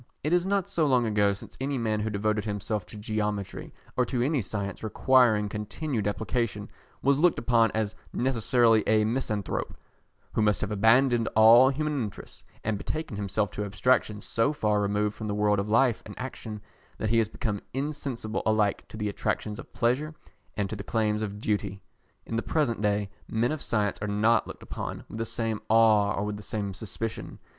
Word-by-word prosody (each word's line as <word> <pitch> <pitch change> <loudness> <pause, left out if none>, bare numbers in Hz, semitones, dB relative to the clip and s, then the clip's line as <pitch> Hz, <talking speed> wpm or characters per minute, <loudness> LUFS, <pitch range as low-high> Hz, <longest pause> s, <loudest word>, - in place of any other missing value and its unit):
It 150 +4 0
is 180 +1 +2
not 200 -1 +1
so 170 -6 +1
long 125 -3 +3
ago 105 -2 +3
since 100 - -11
any 135 0 -1
man 110 -3 0
who 110 +1 -1
devoted 105 0 0
himself 105 -1 -3
to 110 - -11
geometry, 105 -1 -3 0.2
or 125 - +3
to 120 -1 0
any 140 0 +1
science 100 0 -4
requiring 110 -1 +3
continued 105 +3 -3
application, 110 0 -2 0.3
was 140 +1 +3
looked 175 +1 +4
upon 115 -2 +3
as 110 -1 -1 0.2
necessarily 120 -3 +3
a 110 -1 +4
misanthrope, 110 -4 -2 0.6
who - - +1
must 105 -1 +3
have 105 - -2
abandoned 115 +3 +4
all 115 +4 +8
human 150 0 -1
interests, 105 -3 -7 0.2
and 105 -2 -1
betaken 155 -4 -4
himself 100 +1 -1
to 105 - -3
abstractions 105 +1 +1
so 115 +5 +1
far 105 -7 +1
removed 105 +1 0
from 110 - -5
the 105 - -2
world 105 -1 +2
of 100 +2 -2
life 115 +1 +3
and 105 - -10
action 110 -5 -6 0.3
that 110 - -2
he 115 - +4
has 110 - +2
become 110 -4 -3
insensible 135 -5 -3
alike 110 -2 +1
to - - -10
the 105 -1 -2
attractions 105 +1 -2
of - - -11
pleasure 135 +6 0 0.4
and 100 -2 0
to 110 - -5
the 100 - -6
claims 105 -1 0
of 105 -1 -4
duty. 105 -2 -1 0.5
In 115 - -4
the - - +1
present 125 -9 0
day, 105 -1 0 0.2
men 115 +4 0
of 155 -2 -3
science 105 -3 0
are 105 - -2
not 110 +3 +2
looked - - -9
upon - - -6
with 110 - -8
the 115 - -1
same 115 -1 -2
awe 110 -2 +5
or 100 - -1
with 105 0 -3
the - - -9
same 105 -2 -3
suspicion. 110 +3 -5
110 Hz, 190 wpm, -27 LUFS, 105-120 Hz, 0.6 s, all